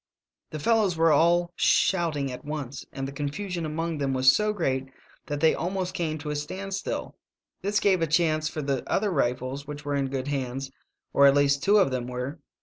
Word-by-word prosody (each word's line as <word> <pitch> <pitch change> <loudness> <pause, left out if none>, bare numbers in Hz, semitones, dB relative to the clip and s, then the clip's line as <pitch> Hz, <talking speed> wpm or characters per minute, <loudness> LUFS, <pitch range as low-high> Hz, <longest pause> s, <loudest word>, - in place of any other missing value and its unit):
"The 155 - -5
fellows 200 +1 +2
were 165 0 +4
all 170 +3 +3
shouting 155 -7 +2
at 125 - -8
once, 145 -3 -5
and 135 0 -4
the - - -6
confusion 165 +5 -3
among 165 0 -3
them 135 -2 0
was 130 0 +6
so 210 0 +1
great 135 -9 -1 0.4
that 145 0 -3
they 160 - +5
almost 185 +1 -2
came 155 -3 -2
to 150 0 -5
a - - -2
standstill. 190 +6 -4 0.5
This 205 +2 +1
gave 190 -4 +3
a 165 - +2
chance 155 -1 +2
for 155 - -5
the 135 -2 -1
other 205 0 +1
rifles, 130 -1 -1
which 145 0 -7
were 145 - -1
in 140 -1 0
good 135 0 -3
hands 135 -1 -3 0.2
— - - -54
or 140 - +7
at 140 - +5
least 140 -1 +3
two 205 +2 +4
of 190 -10 +4
them 125 -1 -2
were. 125 +5 -5
150 Hz, 205 wpm, -26 LUFS, 135-175 Hz, 0.5 s, or